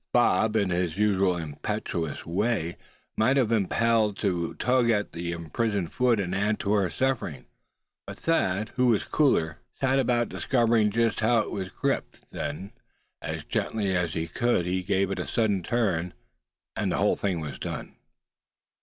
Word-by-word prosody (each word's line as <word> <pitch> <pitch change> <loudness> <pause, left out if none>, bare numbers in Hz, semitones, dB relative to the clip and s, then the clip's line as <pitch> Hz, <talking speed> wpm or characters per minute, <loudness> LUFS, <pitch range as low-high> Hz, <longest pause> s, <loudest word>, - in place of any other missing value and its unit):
Bob 110 0 +3
in 100 -4 +2
his 90 -1 -1
usual 100 -3 +2
impetuous 80 0 -4
way 95 -1 -1 0.4
might 130 +5 +3
have 125 -5 +3
been 110 -4 +2
impelled 110 -1 +2
to 90 -5 -1
tug 125 0 +2
at 105 -2 +1
that 85 - -9
imprisoned 85 +3 -2
foot, 125 -3 +2
and 90 -2 -2
add 105 +2 +1
to 100 - 0
her 100 -4 +2
sufferings; 90 - -2 0.6
but - - -7
Thad, 105 - 0
who 125 -1 +1
was 115 -4 +3
cooler, 85 - +1 0.2
set 135 0 +2
about 120 -2 +2
discovering 115 -4 +2
just 115 0 +1
how 115 +1 +3
it - - -5
was 95 -2 -4
gripped; - - -2
then, 95 +6 -5 0.5
as - - -4
gently 100 -4 -1
as 90 -2 0
he 80 -1 -1
could 120 -1 +1
he 90 +1 0
gave 100 0 0
it 95 - -2
a - - -3
sudden 105 -5 +1
turn, 90 -5 -1 0.6
and - - -1
the - - +2
thing 95 -4 -1
was 75 -3 -6
done. - - -6
100 Hz, 165 wpm, -27 LUFS, 90-115 Hz, 0.6 s, Bob